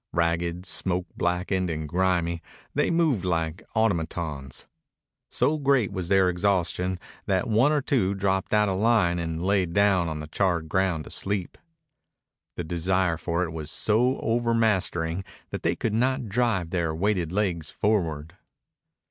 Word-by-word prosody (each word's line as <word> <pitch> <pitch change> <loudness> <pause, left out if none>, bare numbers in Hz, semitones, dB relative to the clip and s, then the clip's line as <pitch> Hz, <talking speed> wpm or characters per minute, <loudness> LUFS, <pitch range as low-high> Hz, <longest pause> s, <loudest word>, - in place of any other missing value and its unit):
Ragged, 85 +1 0
smoke 90 0 -1
blackened, 90 +1 0
and 80 -1 -3
grimy, 85 0 0 0.3
they - - +1
moved 160 - +2
like 85 -1 -1
automatons. 80 - -1 0.6
So 155 +1 +1
great 135 -7 +2
was 95 -3 -4
their 95 -1 +4
exhaustion 90 0 0 0.3
that 95 +4 +1
one 115 +6 +4
or 150 -2 +1
two 100 -9 +1
dropped 95 0 0
out 105 0 +4
of 95 -1 -1
line 105 -6 +3
and 85 +1 -3
lay 95 -2 +2
down 95 -1 +2
on 80 -1 -4
the 75 - -5
charred 85 0 0
ground 90 -2 0
to - - -11
sleep. 95 -2 -3 1.0
The 90 - -3
desire 85 +1 +1
for 85 +1 -1
it 85 - -3
was 80 -2 -6
so 120 +9 +2
overmastering 110 -7 +1 0.3
that - - -4
they - - +1
could 110 - -2
not 130 +2 +1
drive 105 -6 0
their 85 -3 0
weighted 90 -2 0
legs 90 -6 -1
forward. 85 -6 -1
95 Hz, 150 wpm, -26 LUFS, 85-105 Hz, 1.0 s, their